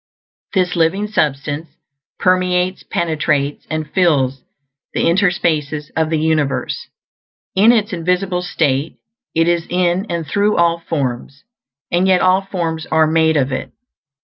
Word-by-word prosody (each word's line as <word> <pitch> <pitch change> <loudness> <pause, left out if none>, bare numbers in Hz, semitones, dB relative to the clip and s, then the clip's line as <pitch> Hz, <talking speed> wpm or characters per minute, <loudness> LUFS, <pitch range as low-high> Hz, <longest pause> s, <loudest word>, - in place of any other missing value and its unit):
This 185 -1 +1
Living 170 +5 +1
Substance 150 -5 -1 0.5
permeates, 185 0 +1
penetrates, 150 -4 -1
and 155 -1 -3
fills 140 -8 +2 0.5
the - - +1
interspaces 165 -5 +1
of 160 -1 +1
the 160 - +1
universe. 155 -3 -1 0.7
In 205 +5 +6
its 220 -3 +1
invisible 180 +1 0
state 155 -5 -1 0.4
it 165 +1 +3
is 170 -1 +1
in 180 +3 +1
and 170 -2 -2
through 205 +7 +1
all 170 0 +3
forms; 140 -3 -4 0.5
and 175 +2 +2
yet 185 -1 +4
all 185 +1 +3
forms 170 -5 -4
are 160 0 +3
made 160 0 +2
of 135 -1 +1
it. - - -4
165 Hz, 130 wpm, -18 LUFS, 155-185 Hz, 0.7 s, In